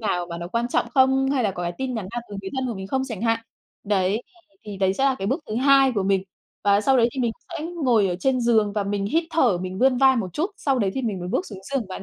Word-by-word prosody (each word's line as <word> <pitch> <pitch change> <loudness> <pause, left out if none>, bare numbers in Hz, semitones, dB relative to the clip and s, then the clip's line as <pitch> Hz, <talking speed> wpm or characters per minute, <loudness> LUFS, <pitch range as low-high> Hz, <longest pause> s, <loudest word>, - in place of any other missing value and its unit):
nào 180 -5 -1
mà 170 -1 -6
nó 170 0 -6
quan 235 +5 -1
trọng - - +1
không, 265 0 +4
hay 265 -4 +1
là 205 - +2
có 180 -2 -6
cái 175 0 -2
tin 265 -1 -2
nhắn 215 -5 -4
nào 240 - -3
từ 205 - -7
người 195 -1 -7
thân 265 -1 -1
của 235 - -3
mình 190 -1 -6
không 265 +6 -1
chẳng 225 -4 -6
hạn. 230 -1 +1 0.4
Đấy, 200 +2 +1 0.4
thì 205 -2 -7
đấy 190 -1 +2
sẽ 265 - 0
là 270 -1 +3
cái 195 - -3
bước 265 - 0
thứ 215 - -3
hai 270 +1 +5
của 200 - +1
mình. 195 0 +1 0.4
Và 200 0 +4
sau 265 +5 +3
đấy 235 -1 +4
thì 265 - -3
mình 235 -2 +1 0.3
sẽ 305 - -5 0.2
ngồi 225 -6 +4
ở 175 - -2
trên 260 +4 +1
giường 220 -3 +2
và 205 0 0
mình 200 0 -2
hít 325 +11 +1
thở 255 - +3
mình 185 +1 -5
vươn 260 0 +4
vai 265 0 +5
một 190 -7 -3
chút, 335 - -1
sau 270 -3 0
đấy 200 -4 +1
thì 265 - -2
mình 215 -6 -2
mới 180 - -5
bước 370 - -1
xuống 200 - -9
giường 250 -8 -1
bạn 190 - -7
225 Hz, 300 wpm, -23 LUFS, 195-265 Hz, 0.4 s, hai